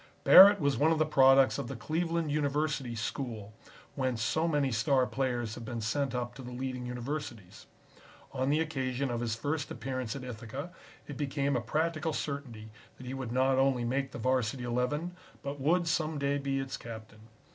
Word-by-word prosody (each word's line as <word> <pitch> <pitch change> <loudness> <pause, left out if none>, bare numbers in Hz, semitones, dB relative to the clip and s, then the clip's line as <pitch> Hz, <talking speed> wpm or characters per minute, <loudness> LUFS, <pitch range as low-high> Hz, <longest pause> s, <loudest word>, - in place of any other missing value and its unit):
Barrett 200 +1 +9
was 140 -5 +1
one 155 +3 +4
of 165 - +2
the 155 - +3
products 135 -2 +5
of 140 - -4
the 135 - -5
Cleveland 165 +4 -1
University 145 -3 -1
School, 115 -2 -5 0.4
whence 130 -4 -1
so 155 +9 +1
many 145 -4 +1
star 130 +3 +2
players 125 -4 -2
have 120 - -8
been 115 0 -5
sent 130 +4 -1
up 120 0 -3
to 135 - -10
the 125 - -8
leading 125 0 -4
universities. 125 -5 -6 0.6
On 130 0 -1
the 150 +2 +2
occasion 135 -4 -2
of 120 - -2
his 115 -2 -1
first 145 +6 -2
appearance 125 0 -4
at 135 - -6
Ithaca 125 +6 -7 0.4
it 145 - -7
became 140 -1 -1
a 120 - 0
practical 155 +5 -1
certainty 125 -8 -5 0.3
that 130 - -11
he 125 - -5
would 130 -3 -5
not 130 +1 +2
only 135 -3 +2
make 135 +3 -1
the - - -8
Varsity 125 0 0
Eleven, 125 +9 -1 0.3
but 140 +1 -5
would 170 +5 +2
some 160 -1 0
day 140 0 0
be 135 -1 -1
its 135 0 -3
captain. 110 -2 -10
135 Hz, 185 wpm, -30 LUFS, 120-145 Hz, 0.6 s, Barrett